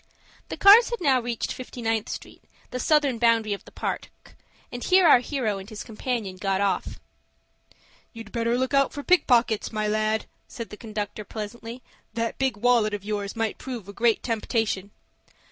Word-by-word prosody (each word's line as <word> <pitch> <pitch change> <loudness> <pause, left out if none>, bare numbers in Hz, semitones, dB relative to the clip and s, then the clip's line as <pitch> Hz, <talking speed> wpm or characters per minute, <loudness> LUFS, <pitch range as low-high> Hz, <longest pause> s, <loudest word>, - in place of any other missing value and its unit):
The - - -5
cars 420 +4 +8
had 475 - -3
now 270 -7 +3
reached 235 -1 -3
Fifty 255 -1 -9
ninth 225 -2 -1
Street, - - -8 0.3
the 250 - -3
southern 285 -3 +2
boundary 225 -3 +3
of 200 - -7
the - - -14
Park, - - -4 0.6
and 245 - -6
here 370 -1 +5
our 255 - +8
hero 240 -6 -2
and 195 +2 -10
his 215 -2 -7
companion 220 -4 -4
got 195 0 0
off. 200 -1 -1 1.1
"You'd 225 -2 -10
better 235 0 0
look 260 +2 -1
out 275 0 +3
for 285 - -6
pickpockets, 245 - +3
my 215 -1 -1
lad," 215 +1 0 0.2
said 230 -2 -8
the - - -7
conductor, 210 -1 -5
pleasantly. 230 +3 -7 0.3
"That 230 0 -2
big 265 -5 0
wallet 225 -2 +3
of 200 -1 -8
yours 205 -1 -3
might 225 -2 -2
prove 240 -7 -6
a 200 - -9
great 235 0 +2
temptation." 220 -4 -1
230 Hz, 175 wpm, -25 LUFS, 210-250 Hz, 1.1 s, cars